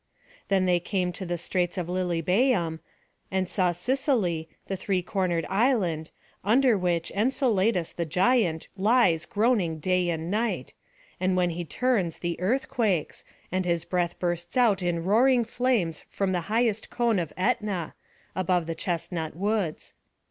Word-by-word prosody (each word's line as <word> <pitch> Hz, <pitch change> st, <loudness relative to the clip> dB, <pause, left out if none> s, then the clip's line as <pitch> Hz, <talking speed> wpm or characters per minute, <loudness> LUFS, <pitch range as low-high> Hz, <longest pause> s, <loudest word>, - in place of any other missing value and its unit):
Then 190 Hz, -1 st, +2 dB
they 180 Hz, -1 st, +3 dB
came 180 Hz, 0 st, -1 dB
to 190 Hz, -, -6 dB
the 175 Hz, 0 st, -1 dB
straits 175 Hz, +1 st, -1 dB
by 180 Hz, -, -1 dB
Lilybæum, 180 Hz, -, +1 dB, 0.5 s
and 190 Hz, -1 st, 0 dB
saw 180 Hz, -1 st, +1 dB
Sicily, 180 Hz, -, 0 dB, 0.2 s
the 195 Hz, -, -3 dB
three 185 Hz, -1 st, -1 dB
cornered 180 Hz, -3 st, -1 dB
island, 190 Hz, -, +1 dB, 0.3 s
under 240 Hz, +4 st, +4 dB
which 175 Hz, -3 st, 0 dB
Enceladus 215 Hz, -, +1 dB
the 170 Hz, -, -2 dB
giant 180 Hz, -, +2 dB
lies 195 Hz, -5 st, +3 dB
groaning 210 Hz, -7 st, +1 dB
day 180 Hz, +2 st, +1 dB
and 165 Hz, +1 st, -3 dB
night, 225 Hz, +3 st, -1 dB, 0.5 s
and 185 Hz, 0 st, +1 dB
when 180 Hz, -1 st, +2 dB
he 175 Hz, +1 st, -4 dB
turns 195 Hz, -3 st, 0 dB
the 170 Hz, -1 st, -3 dB
earth 235 Hz, +10 st, 0 dB
quakes, 220 Hz, -, -1 dB, 0.3 s
and 185 Hz, +1 st, 0 dB
his 170 Hz, -2 st, 0 dB
breath 175 Hz, -2 st, -1 dB
bursts 175 Hz, +3 st, -2 dB
out 220 Hz, -6 st, +4 dB
in 175 Hz, -2 st, -1 dB
roaring 240 Hz, +5 st, +4 dB
flames 230 Hz, -8 st, 0 dB
from 195 Hz, -1 st, -1 dB
the 180 Hz, -2 st, 0 dB
highest 225 Hz, -1 st, +1 dB
cone 235 Hz, -4 st, +1 dB
of 165 Hz, -4 st, -3 dB
Ætna, 200 Hz, -4 st, -1 dB, 0.4 s
above 180 Hz, -2 st, +1 dB
the 165 Hz, -, -3 dB
chestnut 165 Hz, -2 st, -3 dB
woods. 200 Hz, -3 st, -2 dB
185 Hz, 150 wpm, -27 LUFS, 170-220 Hz, 0.5 s, under